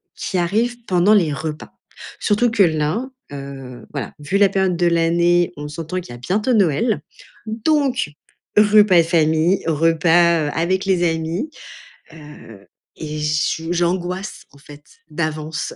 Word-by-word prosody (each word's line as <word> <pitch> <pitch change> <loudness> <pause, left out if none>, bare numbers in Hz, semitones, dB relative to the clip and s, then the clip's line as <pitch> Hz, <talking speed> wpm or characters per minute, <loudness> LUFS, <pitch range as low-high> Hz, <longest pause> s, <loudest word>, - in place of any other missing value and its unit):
qui 185 - -3
arrivent 235 +7 -1
pendant 185 +2 +3
les 175 -8 +3
repas. 155 +2 -6 0.5
Surtout 225 +3 +1
que 225 -2 +1
là, 160 +8 0 0.2
heu, 135 -3 -9
voilà, 135 -8 -5
vu 150 +7 -1
la 200 -1 +5
période 190 -1 0
de 175 +1 0
l'année, 170 +1 +2
on 150 0 -7
s'entend 165 +4 -5
qu'il 170 - -12
y - - -9
a - - -16
bientôt 210 - 0
Noël. 205 - +1 0.5
Donc, 260 - 0 0.5
repas 210 -2 +6
de - - 0
famille, 165 +2 +2
repas, 165 0 +3
heu, - - -2
avec 185 +3 0
les 185 -3 +1
amis. 165 - -3 0.6
Heu, 145 -10 -14 0.3
et 155 -1 -6
je 150 +2 -1
j'angoisse 180 +3 -2
en 140 - -19
fait 145 0 -14 0.3
d'avance 155 -2 -4
170 Hz, 145 wpm, -20 LUFS, 155-195 Hz, 0.6 s, repas